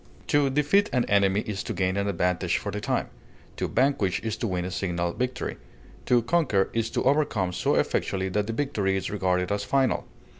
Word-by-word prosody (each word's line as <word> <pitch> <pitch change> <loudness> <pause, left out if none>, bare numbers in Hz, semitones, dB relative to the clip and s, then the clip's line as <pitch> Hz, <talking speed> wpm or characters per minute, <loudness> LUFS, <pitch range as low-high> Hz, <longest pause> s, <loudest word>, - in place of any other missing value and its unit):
To 145 -1 +3
defeat 150 +9 +3
an 125 -2 +1
enemy 100 0 +3
is 100 -3 -4
to - - -4
gain 95 0 0
an 100 0 0
advantage 90 -2 0
for 100 - -4
the 105 +1 -4
time; - - -1 0.5
to - - -2
vanquish 110 -8 +1
is 110 -1 -2
to 115 - -2
win 90 -2 -2
a 90 - -4
signal 85 -2 -2
victory; 125 0 -3 0.5
to 120 -2 +4
conquer 125 - +1
is 115 -1 0
to - - -1
overcome 130 -10 +1
so - - +1
effectually 95 -1 0
that 105 +2 -1
the 115 - -2
victory 105 -8 0
is 95 - -3
regarded 90 -2 0
as 100 0 0
final. 135 -2 +1
100 Hz, 195 wpm, -26 LUFS, 95-125 Hz, 0.5 s, to